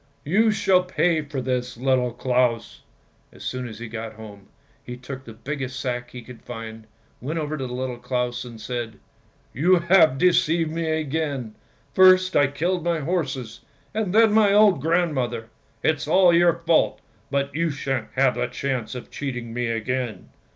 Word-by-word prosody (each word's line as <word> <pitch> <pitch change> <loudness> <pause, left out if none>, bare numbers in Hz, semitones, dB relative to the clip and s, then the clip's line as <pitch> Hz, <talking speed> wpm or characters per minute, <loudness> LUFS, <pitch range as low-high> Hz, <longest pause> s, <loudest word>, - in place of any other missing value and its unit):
:< - - -39
You 220 +2 +5
shall 190 -3 +3
pay 175 -3 +1
for 145 -2 -5
this, 125 -1 -2
Little 130 0 +1
Claus! 125 -1 0 0.2
" - - -38
As - - -13
soon 125 -1 -4
as 110 -2 -9
he 120 +1 -7
got 110 0 -6
home, 105 -2 -12 0.4
he 125 0 -8
took 130 +1 -8
the 115 - -10
biggest 130 +2 -5
sack 125 -1 -3
he 125 -1 -9
could 125 0 -12
find, 115 -2 -8 0.3
went 150 +7 -3
over 155 -1 -2
to 135 -3 -4
Little 125 0 -4
Claus 125 -1 -2
and 120 -2 -10
said, 115 -2 -5 0.2
— - - -36
" - - -37
You 175 +6 +4
have 170 -5 +4
deceived 165 -1 +2
me 165 0 -2
again! 150 -6 -2 0.4
First 185 0 +6
I 145 - +5
killed 170 +5 -1
my 170 -2 0
horses, 135 -8 -3 0.3
and 215 -3 -1
then 220 +1 +5
my 215 -2 +5
old 205 -7 +5
grandmother! 135 -9 0 0.3
It's 155 -1 0
all 180 +2 +5
your 170 0 +3
fault, 165 -1 +3 0.3
but 140 0 -1
you 165 +3 0
shan't 135 -4 -3
have 135 -1 +3
the - - -1
chance 125 -1 -3
of 125 - -8
cheating 125 -5 -5
me 120 0 -1
again! 115 +1 -3
135 Hz, 180 wpm, -23 LUFS, 120-165 Hz, 0.4 s, First